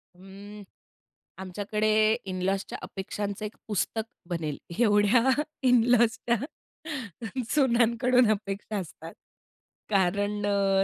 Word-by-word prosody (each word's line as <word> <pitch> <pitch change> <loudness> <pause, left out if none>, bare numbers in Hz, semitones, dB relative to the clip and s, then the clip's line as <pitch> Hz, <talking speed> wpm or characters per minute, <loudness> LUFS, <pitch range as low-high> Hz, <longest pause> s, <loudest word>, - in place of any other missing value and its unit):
अं, 200 +3 -11 0.8
आमच्याकडे 205 +3 -2 0.4
इन 185 -1 -4
लॉजच्या 195 +1 -1
अपेक्षांचं 200 +1 -5
एक 210 - -7
पुस्तक 220 +1 -1 0.3
बनेल. 160 -4 -3 0.2
एवढ्या 220 +2 +4 0.4
इन 245 -2 +5
लॉजच्या 235 0 +3 1.1
सुनानंकडून 245 -2 +3
अपेक्षा 205 0 -3
असतात. 165 -3 -7 0.8
कारण 205 +1 +1
अ, 195 -1 +2
205 Hz, 90 wpm, -27 LUFS, 195-225 Hz, 1.1 s, इन